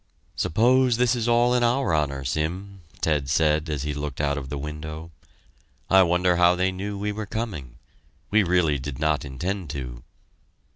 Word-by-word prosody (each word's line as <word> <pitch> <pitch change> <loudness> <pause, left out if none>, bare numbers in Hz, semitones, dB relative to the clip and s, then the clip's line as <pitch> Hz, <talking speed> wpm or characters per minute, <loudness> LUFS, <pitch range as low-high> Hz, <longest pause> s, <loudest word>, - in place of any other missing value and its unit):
"Suppose 125 +5 +3
this 125 0 +2
is 120 -1 -2
all 120 +1 +3
in 125 - +2
our 120 -5 +1
honor, 70 -3 -1
Sim," 90 +8 -3 0.2
Ted 75 -4 0
said 75 +1 +2
as 75 -3 -2
he 75 0 -2
looked 75 -2 -5
out 70 -1 +1
of 70 -2 -6
the 75 - -4
window. 75 +3 -7 0.8
"I 95 0 +7
wonder 90 0 +2
how 90 0 +5
they 95 +1 +1
knew 100 +2 -5
we 105 +1 -2
were 105 0 -5
coming 85 - -5 0.6
we 110 +1 +5
really 85 -6 +2
did 65 0 -6
not 75 0 0
intend 85 +6 -4
to." 60 -4 -6
85 Hz, 175 wpm, -24 LUFS, 75-100 Hz, 0.8 s, I